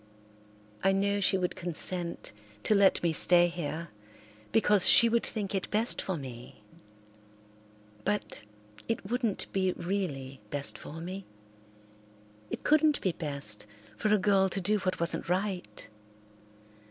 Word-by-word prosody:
I 195 Hz, 0 st, +4 dB
know 200 Hz, +1 st, +1 dB
she 190 Hz, -, +3 dB
would 180 Hz, -1 st, -2 dB
consent 175 Hz, 0 st, -2 dB, 0.3 s
to -, -, +3 dB
let 200 Hz, -3 st, +4 dB
me 170 Hz, -2 st, +2 dB
stay 175 Hz, +2 st, +7 dB
here, 170 Hz, -1 st, -5 dB, 0.6 s
because 210 Hz, -3 st, +5 dB
she 235 Hz, -, +8 dB
would 230 Hz, 0 st, +1 dB
think 205 Hz, -3 st, -4 dB
it 195 Hz, -, -2 dB
best 220 Hz, +3 st, +1 dB
for 190 Hz, -3 st, -3 dB
me, 120 Hz, -5 st, -10 dB, 1.4 s
but 210 Hz, -, -2 dB, 0.5 s
it 225 Hz, -2 st, -3 dB
wouldn't 240 Hz, -5 st, 0 dB
be 185 Hz, -1 st, +1 dB
really 150 Hz, -, -4 dB
best 140 Hz, +2 st, -3 dB
for 165 Hz, +2 st, -9 dB
me; 185 Hz, +3 st, -7 dB, 1.2 s
it -, -, -5 dB
couldn't 305 Hz, -1 st, +3 dB
be 185 Hz, -, 0 dB
best 140 Hz, -11 st, -4 dB, 0.3 s
for 215 Hz, -, -1 dB
a 215 Hz, -, +5 dB
girl 195 Hz, -1 st, +3 dB
to 190 Hz, -, -2 dB
do 210 Hz, +3 st, +1 dB
what 185 Hz, -1 st, -2 dB
wasn't 170 Hz, 0 st, -1 dB
right. 185 Hz, 0 st, -2 dB
185 Hz, 135 wpm, -29 LUFS, 170-205 Hz, 1.4 s, she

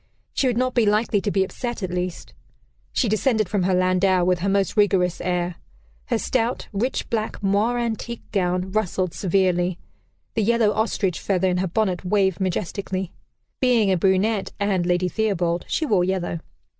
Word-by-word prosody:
She 270 Hz, -, +1 dB
would 245 Hz, -2 st, 0 dB
not 255 Hz, 0 st, +1 dB
be 235 Hz, -4 st, +3 dB
likely 210 Hz, 0 st, +2 dB
to 205 Hz, -, -1 dB
be 195 Hz, -1 st, +2 dB
"upset," 235 Hz, +4 st, -5 dB
at 185 Hz, -, -2 dB
least. 180 Hz, -1 st, -4 dB, 0.6 s
She 250 Hz, -, +1 dB
descended 215 Hz, 0 st, +1 dB
from 200 Hz, +1 st, 0 dB
her 185 Hz, +1 st, +1 dB
landau, 185 Hz, 0 st, +3 dB
with 180 Hz, 0 st, +2 dB
her 195 Hz, +3 st, 0 dB
most 195 Hz, 0 st, +1 dB
rigorous 190 Hz, -4 st, +2 dB
air. 180 Hz, -1 st, -1 dB, 0.5 s
Her -, -, 0 dB
stout, 245 Hz, 0 st, -1 dB
rich 235 Hz, +6 st, -1 dB
black 220 Hz, -2 st, -2 dB
moire 205 Hz, +5 st, +2 dB
antique 235 Hz, 0 st, -3 dB
gown 185 Hz, -1 st, 0 dB
rustled 185 Hz, -4 st, -1 dB
severely; 180 Hz, -2 st, +1 dB, 0.6 s
the 225 Hz, -, 0 dB
yellow 225 Hz, 0 st, +3 dB
ostrich 210 Hz, -4 st, 0 dB
feather 190 Hz, -1 st, +1 dB
in 180 Hz, -, 0 dB
her 185 Hz, +1 st, 0 dB
bonnet 185 Hz, -1 st, 0 dB
waved 190 Hz, -1 st, +1 dB
majestically. 185 Hz, 0 st, -3 dB, 0.5 s
(Being 235 Hz, -6 st, +3 dB
a -, -, +4 dB
brunette, 195 Hz, +3 st, +1 dB
and 195 Hz, -4 st, +1 dB
Lady 180 Hz, 0 st, +2 dB
Theobald, 180 Hz, -3 st, 0 dB
she 320 Hz, -, 0 dB
wore 205 Hz, -10 st, +2 dB
yellow.) 180 Hz, -2 st, -1 dB
195 Hz, 170 wpm, -23 LUFS, 180-220 Hz, 0.6 s, a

